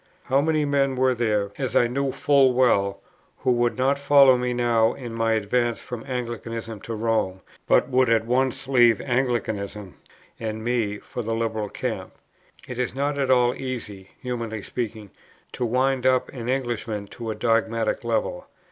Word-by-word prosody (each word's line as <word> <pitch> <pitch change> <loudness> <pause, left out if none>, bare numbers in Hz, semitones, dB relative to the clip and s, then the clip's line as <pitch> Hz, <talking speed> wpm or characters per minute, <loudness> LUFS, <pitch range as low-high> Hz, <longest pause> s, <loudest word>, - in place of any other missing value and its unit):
How 135 +2 +2
many 155 0 +1
men 140 -2 +1
were 130 0 +3
there, 105 -4 0
as 130 -2 -2
I - - +5
knew 135 +3 -1
full 135 -2 +3
well, 100 -6 +2 0.4
who - - +1
would 120 0 +1
not 135 +2 +2
follow 140 -2 +6
me 125 0 -1
now 120 -2 +2
in 120 -3 -7
my 115 0 +1
advance 115 +2 0
from 120 -2 -7
Anglicanism 115 -3 -5
to 115 - -5
Rome, 110 -4 -1 0.3
but - - +4
would 130 -2 +2
at 115 -1 +3
once 130 +2 0
leave 120 -5 +5
Anglicanism 110 -6 -2 0.5
and 110 -1 -4
me 115 -4 0
for 120 - -7
the 115 0 -2
Liberal 110 -2 -2
camp. - - -4 0.5
It 125 -1 -6
is 125 -1 -2
not 140 +1 -1
at 135 -2 0
all 125 -1 +4
easy 105 -7 -6
(humanly 115 -4 -4
speaking) 110 -4 -5 0.4
to 125 - -2
wind 130 +2 +1
up 130 -1 +2
an 120 -2 -6
Englishman 120 -5 -2
to 115 -1 -7
a 110 - -2
dogmatic 115 -1 0
level. - - -2
120 Hz, 165 wpm, -24 LUFS, 110-130 Hz, 0.5 s, follow